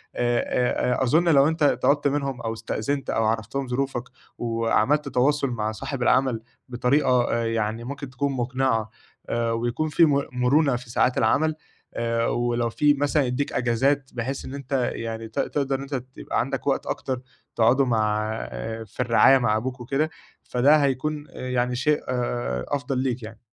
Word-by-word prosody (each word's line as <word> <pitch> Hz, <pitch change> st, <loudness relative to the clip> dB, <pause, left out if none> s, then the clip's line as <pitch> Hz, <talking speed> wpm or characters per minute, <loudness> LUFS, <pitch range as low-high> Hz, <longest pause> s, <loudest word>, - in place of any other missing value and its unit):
آآ، 120 Hz, +1 st, +1 dB
آآ، -, -, +2 dB
أظُن 160 Hz, +7 st, +3 dB
لو 140 Hz, -3 st, +6 dB
أنت 160 Hz, -1 st, -1 dB
طلبت 145 Hz, +1 st, +3 dB
منهم 140 Hz, -2 st, -2 dB
أو 115 Hz, -1 st, -2 dB
استأذنت 115 Hz, +4 st, -3 dB
أو 110 Hz, -, +1 dB
عرَّفتهم 110 Hz, +5 st, -1 dB
ظروفك 125 Hz, 0 st, -2 dB, 0.3 s
وعملت 115 Hz, +5 st, +1 dB
تواصل 140 Hz, +3 st, +2 dB
مع 110 Hz, -3 st, -2 dB
صاحب 125 Hz, +4 st, -4 dB
العمل 125 Hz, -2 st, +2 dB, 0.3 s
بطريقة 125 Hz, 0 st, +2 dB
آآ، 115 Hz, 0 st, 0 dB
يعني 115 Hz, 0 st, -1 dB
ممكن 140 Hz, +2 st, -6 dB
تكون 140 Hz, +3 st, -2 dB
مقنعة 125 Hz, -3 st, 0 dB, 0.4 s
آآ، 115 Hz, 0 st, 0 dB
ويكون 120 Hz, +7 st, -1 dB
في 165 Hz, +3 st, +5 dB
م 140 Hz, -2 st, +2 dB
مرونة 130 Hz, +3 st, +2 dB
في 120 Hz, 0 st, -7 dB
ساعات 125 Hz, +2 st, +1 dB
العمل، 155 Hz, +8 st, +2 dB, 0.4 s
آآ، 115 Hz, 0 st, 0 dB
ولو 120 Hz, -1 st, 0 dB
في 145 Hz, +5 st, +3 dB
مثلًا 145 Hz, +1 st, +1 dB
يدّيك 130 Hz, +3 st, -2 dB
أجازات 135 Hz, +3 st, +1 dB
بحيث 130 Hz, +3 st, -4 dB
إن 130 Hz, -, -7 dB
أنت 135 Hz, -2 st, -1 dB
يعني 115 Hz, 0 st, -5 dB
ت 110 Hz, -, -5 dB
تقدر 135 Hz, -2 st, -1 dB
أنت 140 Hz, +1 st, -4 dB
تبقى 130 Hz, 0 st, -4 dB
عندك -, -, -2 dB
وقت -, -, +1 dB
أكتر 130 Hz, -1 st, -3 dB, 0.3 s
تقعده 125 Hz, +4 st, +4 dB
مع 110 Hz, -3 st, +1 dB, 0.6 s
في 105 Hz, -, -23 dB
الرعاية 125 Hz, +2 st, +5 dB
مع 110 Hz, -4 st, +2 dB
أبوك 130 Hz, +3 st, -4 dB
وكده، 135 Hz, +6 st, 0 dB, 0.3 s
فده 135 Hz, +5 st, +4 dB
هيكون 145 Hz, +2 st, -1 dB
آآ، 130 Hz, -, -7 dB
يعني 125 Hz, 0 st, 0 dB
شيء 150 Hz, +4 st, +2 dB, 0.7 s
أفضل 140 Hz, -1 st, -2 dB
ليك 125 Hz, -2 st, -1 dB
يعني. 110 Hz, 0 st, -9 dB
125 Hz, 160 wpm, -24 LUFS, 115-140 Hz, 0.7 s, لو